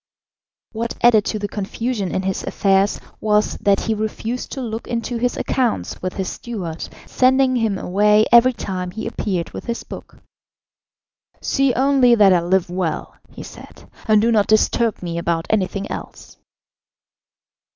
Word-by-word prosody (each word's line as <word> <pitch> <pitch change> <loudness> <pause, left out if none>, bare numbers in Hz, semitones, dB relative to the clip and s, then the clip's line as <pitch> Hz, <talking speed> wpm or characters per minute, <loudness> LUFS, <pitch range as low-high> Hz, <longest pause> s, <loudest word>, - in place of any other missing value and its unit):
What 230 +1 -4
added 225 -3 +5
to 215 - -2
the 205 -1 -3
confusion 205 +1 -3
in 190 - -2
his 190 0 -2
affairs 195 0 +1 0.2
was 210 0 +1
that 200 -1 +2
he 225 - -1
refused 220 +3 -4
to - - -5
look 230 -3 -5
into 235 +1 -3
his 245 +1 -1
accounts 250 -4 -1
with 185 0 -3
his 190 -1 -3
steward, 185 -9 -6 0.2
sending 260 0 +3
him 220 -4 0
away 210 +4 +3
every 240 +2 +6
time 185 -5 -4
he 220 +5 -6
appeared 180 -5 -3
with - - -8
his 235 0 -4
book. - - -11 1.2
"See 275 -1 +1
only 260 -2 +4
that 200 -4 +6
I 175 - +3
live 185 +1 +1
well," 180 -2 -3 0.2
he - - -10
said, - - -13 0.2
"and 215 -1 +5
do 230 +2 +2
not 210 -3 +3
disturb 215 0 +2
me 170 -1 -3
about 170 -1 -1
anything 200 -1 -1
else." - - -9
215 Hz, 155 wpm, -20 LUFS, 190-235 Hz, 1.2 s, every